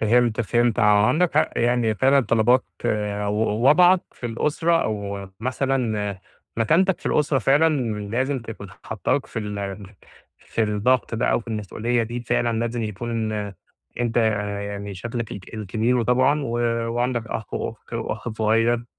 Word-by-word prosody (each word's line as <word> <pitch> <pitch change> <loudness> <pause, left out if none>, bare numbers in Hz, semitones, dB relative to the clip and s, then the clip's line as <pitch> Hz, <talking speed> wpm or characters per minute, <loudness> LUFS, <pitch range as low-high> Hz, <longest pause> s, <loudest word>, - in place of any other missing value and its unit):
فهمت 115 +1 +3
فهمت، 120 0 +1
عندَك 105 +12 +3
حق 155 - +3
يعني، 120 -2 +2
فعلًا 135 +7 +4
طلبات 120 +2 +3 0.2
ووضعك 110 - +3
في 120 - -6
الأسرة 155 +8 +1
أو 100 -2 -4
مثلًا 120 -6 -1 0.4
مكانتَك 170 - +2
في - - -7
الأسرة، 150 -2 +2
فعلًا 145 +4 +3 0.3
لازِم 130 +4 0
تكون 115 -4 -9 0.2
حطَّاك 110 +6 -1
في - - -5
ال 100 -2 -5 0.5
في 115 - -2
الضغط 110 +4 +1
ده 115 - 0
أو - - +2
في 115 - -13
المسؤولية 110 +2 -1
دي. 120 +2 -4
فعلًا 120 -1 0
لازم 115 0 -2
يكون 110 +1 -3 0.7
أنتَ 120 -1 -1
يعني 100 -2 -1
شكلَك 115 +4 -5
ال 100 - -6 0.2
الكبير، 110 +5 0
وطبعًا 130 +5 +2
وعندَك 120 0 -1
أخ 110 -1 -5
وأخت - - -6
وأخ - - -4
صغير. 115 +2 +1
115 Hz, 135 wpm, -23 LUFS, 105-125 Hz, 0.7 s, فعلًا